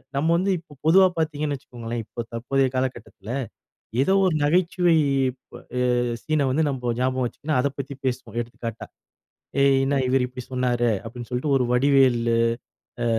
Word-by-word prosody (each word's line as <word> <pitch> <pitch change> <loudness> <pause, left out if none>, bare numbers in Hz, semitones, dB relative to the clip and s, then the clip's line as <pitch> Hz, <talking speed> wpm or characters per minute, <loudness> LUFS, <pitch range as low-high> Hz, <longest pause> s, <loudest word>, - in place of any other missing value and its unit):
நம்ப 150 +4 +1
வந்து 195 +2 +1
இப்ப 155 -3 -17
பொதுவா 185 +4 +7
பாத்தீங்கன்னு 150 -2 -1
வச்சுக்கோங்களேன், 120 -2 -6
இப்ப 120 - -6
தற்போதைய 130 +3 +1
காலக்கட்டத்துல. 120 -5 -4 0.7
ஏதோ 165 +8 +3
ஒரு 180 - +2
நகைச்சுவை 175 +2 +3 0.4
இப் 130 0 -12 0.2
அ 125 0 +2 0.3
சீன 155 -3 +1
வந்து 155 +5 +2
நம்போ 125 -3 -2
ஞாபகம் 130 0 +1
வச்சுக்குனா 145 +4 -2
அத 140 - +1
பத்தி 140 0 -5
பேசுவோம். 125 -2 -3
எடுத்துக்காட்டா, 115 -1 -7 0.8
"ஏய்! 135 -1 +5
என்னா 140 0 +1
இவரு 130 -1 +2
இப்படி 125 -1 -8
சொன்னாரு." 120 -2 +1
அப்படீன்னு 120 +1 -8
சொல்லிட்டு 135 +3 0
ஒரு 125 - +1
வடிவேலு 125 -3 +3 0.7
அ - - 0
130 Hz, 150 wpm, -24 LUFS, 120-145 Hz, 0.8 s, பொதுவா